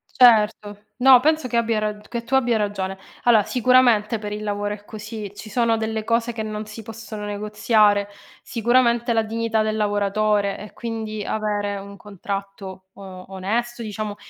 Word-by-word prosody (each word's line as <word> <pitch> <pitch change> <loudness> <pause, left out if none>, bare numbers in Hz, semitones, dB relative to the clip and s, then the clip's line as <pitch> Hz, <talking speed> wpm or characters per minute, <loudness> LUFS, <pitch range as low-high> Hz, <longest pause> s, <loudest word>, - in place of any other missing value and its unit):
Certo. 215 -4 +4
No, 260 0 +8
penso 310 -1 +1
che 235 - -2
abbia 230 -1 +1
rag 210 0 -3
che 235 -1 -4
tu 245 +3 -3
abbia 245 -4 +3
ragione. 195 -2 -3 0.2
Allora, 230 -3 +5
sicuramente 240 -3 +3
per 210 -1 -6
il 210 0 -5
lavoro 205 0 -2
è 205 0 -14
così, 215 -1 -8
ci 215 - -10
sono 230 0 +1
delle 220 0 -3
cose 230 +1 0
che 220 - -3
non 215 0 -5
si 215 +1 -9
possono 220 -1 -8
negoziare, 210 0 +2 0.3
sicuramente 235 0 +2
la 225 - +3
dignità 225 0 -1
del 215 0 -1
lavoratore 205 -1 +1
e 210 - -10
quindi 220 -2 -5
avere 205 -1 -2
un 200 +1 -10
contratto 195 -1 -7
o 190 -2 -10
onesto, 235 +6 -2
diciamo, 215 -1 -5
215 Hz, 165 wpm, -22 LUFS, 205-230 Hz, 0.3 s, No